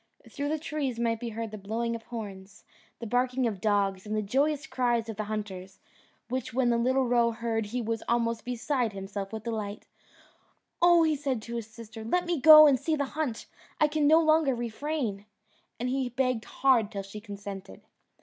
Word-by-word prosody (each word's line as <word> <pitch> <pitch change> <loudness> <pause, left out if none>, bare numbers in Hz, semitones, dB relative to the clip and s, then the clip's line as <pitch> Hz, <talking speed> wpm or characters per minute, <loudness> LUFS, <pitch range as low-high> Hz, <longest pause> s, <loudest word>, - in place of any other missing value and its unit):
Through 285 +1 -4
the 310 - 0
trees 290 -5 -3
might 230 -1 0
be 235 - -4
heard 225 0 -5
the 215 - -7
blowing 230 +4 -2
of 230 - -7
horns, 200 -4 -8 0.3
the 235 - -7
barking 250 +2 +1
of 205 -5 -2
dogs, 200 -2 +1
and 215 0 -4
the 215 - 0
joyous 285 +7 0
cries 240 -6 0
of 220 - -4
the 215 +1 -3
hunters, 195 -3 -6 0.5
which 250 -1 -4
when 250 -2 +3
the 235 - +2
little 260 +2 +2
roe 240 -1 +3
heard 225 -1 -2
he 240 +3 -3
was 225 0 -2
almost 230 -1 0
beside 245 -1 -1
himself 195 0 -6
with 220 -1 -6
delight. 215 -3 -4 1.0
"Oh," 345 -1 +6
said 275 -2 -1
he - - -8
to 235 +2 -7
his 225 -2 -5
sister, 225 -1 -10
"let 355 +11 0
me 345 -5 -1
go 310 +1 +11
and 275 -4 +4
see 320 +4 0
the 285 -2 -1
hunt: 295 -7 -3 0.3
I 305 - +5
can 300 -1 +1
no 315 +2 +7
longer 310 -4 +3
refrain;" 235 -3 -3 0.5
and 245 - -2
he 260 0 -1
begged 250 -2 -1
hard 245 -6 +2
till 200 -1 -4
she 195 +2 -9
consented. 200 - -8
235 Hz, 195 wpm, -28 LUFS, 215-270 Hz, 1.0 s, go